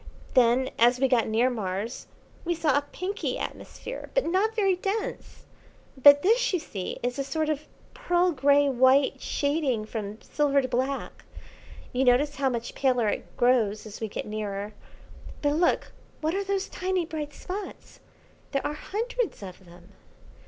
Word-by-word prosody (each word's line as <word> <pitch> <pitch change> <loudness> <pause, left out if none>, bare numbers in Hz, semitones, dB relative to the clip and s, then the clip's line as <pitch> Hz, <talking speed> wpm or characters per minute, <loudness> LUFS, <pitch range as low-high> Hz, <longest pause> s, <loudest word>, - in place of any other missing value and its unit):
Then, 255 +1 +4
as 240 +2 +5
we 265 - +3
got 245 -3 +2
near 230 +4 +2
Mars, 210 +1 -4 0.4
we 345 0 -1
saw 310 -4 +1
a 285 0 0
pinky 385 +3 -3
atmosphere, - - -7
but - - +2
not 390 +6 +1
very 390 -4 +3
dense; 395 +4 -4 0.5
but 285 +2 +7
this, 480 +6 +3
you 370 - +2
see, 200 - -5
is 245 +2 -2
a - - +1
sort 310 +3 -1
of 305 0 -2 0.3
pearl 360 -8 +1
grey 285 0 +4
white 265 +1 +3
shading 285 -7 0
from 215 -1 -5
silver 285 -2 +2
to 260 - -1
black. 260 +2 -2 0.7
You 255 +1 +1
notice 270 +4 +3
how 275 -1 +2
much 235 -1 -4
paler 250 -5 +2
it - - -5
grows 230 -4 +2
as 215 0 -9
we 220 - -1
get 210 - -5
nearer. 210 -1 -4 0.7
But 290 - +3
look 345 - +1 0.3
what 315 +1 -1
are 395 +1 -1
those 395 0 -1
tiny 370 -1 -1
bright 305 -2 -5
spots? 390 +7 -8 0.5
There 275 - 0
are 295 - -1
hundreds 455 - -3
of 185 0 -10
them." 175 +2 -16
275 Hz, 160 wpm, -27 LUFS, 235-345 Hz, 0.7 s, but